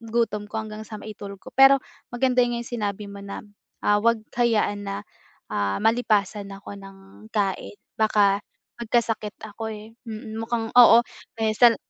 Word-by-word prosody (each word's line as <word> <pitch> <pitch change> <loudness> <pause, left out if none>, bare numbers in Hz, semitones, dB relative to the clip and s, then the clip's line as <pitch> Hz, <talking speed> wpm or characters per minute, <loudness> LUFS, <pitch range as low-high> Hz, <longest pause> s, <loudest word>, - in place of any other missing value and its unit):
gutom 225 -2 -1
ko - - -19
hanggang 215 0 -8
sa 215 - -7
maitulog 200 -2 -8
ko. - - -10
Pero 270 +1 +8 0.3
maganda 250 0 +2
nga 240 - -2
'yong 235 - -8
sinabi 205 -1 -3
mo 200 - -9
na, 200 - -6 0.4
ah, 205 0 +4
huwag 230 +1 +3 0.2
hayaan 215 -4 +2
na, 200 0 -3 0.6
ah, 100 -1 0
malipasan 210 -3 +1
ako 200 +1 -9
ng 195 +2 -14
kain 200 -1 -1 0.2
baka 205 -2 +3 0.4
magkasakit 225 -2 0
ako, 220 +1 -6
eh, 215 +1 -11 0.4
mukhang 225 0 -2
oo. 235 -1 +9 0.4
May 220 -1 +1
sal 235 0 +6
215 Hz, 150 wpm, -24 LUFS, 200-230 Hz, 0.6 s, oo